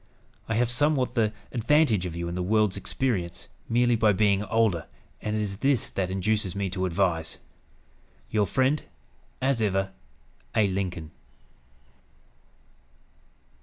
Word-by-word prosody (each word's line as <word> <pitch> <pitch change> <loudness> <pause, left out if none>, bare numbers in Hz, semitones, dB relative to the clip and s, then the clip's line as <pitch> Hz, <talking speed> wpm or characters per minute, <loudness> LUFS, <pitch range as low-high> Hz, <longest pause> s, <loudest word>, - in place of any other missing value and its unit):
I 115 - +1
have 120 +1 +2
somewhat 135 -1 +2
the 110 -4 +2 0.2
advantage 120 - +3
of 85 - -6
you 85 0 -3
in 85 - -4
the 90 - -2
world's 105 +1 +2
experience, 100 -10 -2 0.2
merely 120 +1 +3
by 110 -2 +4
being 100 0 +2
older; 105 -7 +1 0.3
and 105 0 -2
it 110 - 0
is 100 -2 -4
this 135 -1 +1
that 95 -2 -1
induces 95 0 0
me 100 -2 -2
to 95 0 -1
advise. 85 -3 0 0.9
"Your 105 -2 +2
friend, 135 +3 +2 0.6
as 135 -3 +2
ever, 95 -2 +1 0.6
"A. 110 -2 +4
LINCOLN." 90 -4 -3
105 Hz, 130 wpm, -27 LUFS, 95-115 Hz, 0.9 s, by